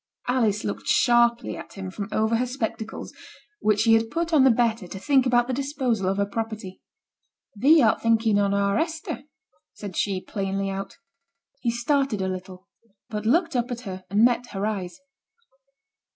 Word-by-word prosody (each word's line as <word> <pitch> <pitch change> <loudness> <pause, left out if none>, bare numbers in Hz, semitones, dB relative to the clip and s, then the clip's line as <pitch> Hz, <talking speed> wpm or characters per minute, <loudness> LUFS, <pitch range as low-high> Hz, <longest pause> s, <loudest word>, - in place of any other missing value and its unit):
Alice 230 -5 +1
looked 105 -1 -4
sharply 235 - +3
at - - -10
him 190 -2 -6
from 200 +1 -6
over 220 +1 +1
her 250 +2 0
spectacles, 225 -3 -5 0.5
which 215 0 +2
she 225 0 +4
had 225 0 +3
put 335 +5 -2
on 290 -4 +6
the 265 - +7
better 230 -4 +1
to 195 - -8
think 265 +5 +2
about 240 -1 +3
the 255 - -3
disposal 260 -7 -1
of 195 - -1
her 200 - +2
property. 215 -2 -5 0.7
'Thee 285 +7 +5
art 220 - +3
thinking 225 -2 +3
on 200 -1 +2
our 200 0 +1
Hester,' 320 -3 -3 0.5
said 200 -4 -8
she, 195 -2 0
plainly 195 0 -3
out. 195 0 -6 0.6
He 245 - -1
started 240 0 0
a 190 - -1
little, 185 0 -7 0.4
but 210 0 -3
looked 330 +4 +2
up 245 0 0
at 245 -1 -5
her 190 -5 -7
and 205 +4 +4
met 245 0 +1
her 195 +1 -2
eyes. 190 -5 -3
225 Hz, 175 wpm, -25 LUFS, 195-245 Hz, 0.7 s, the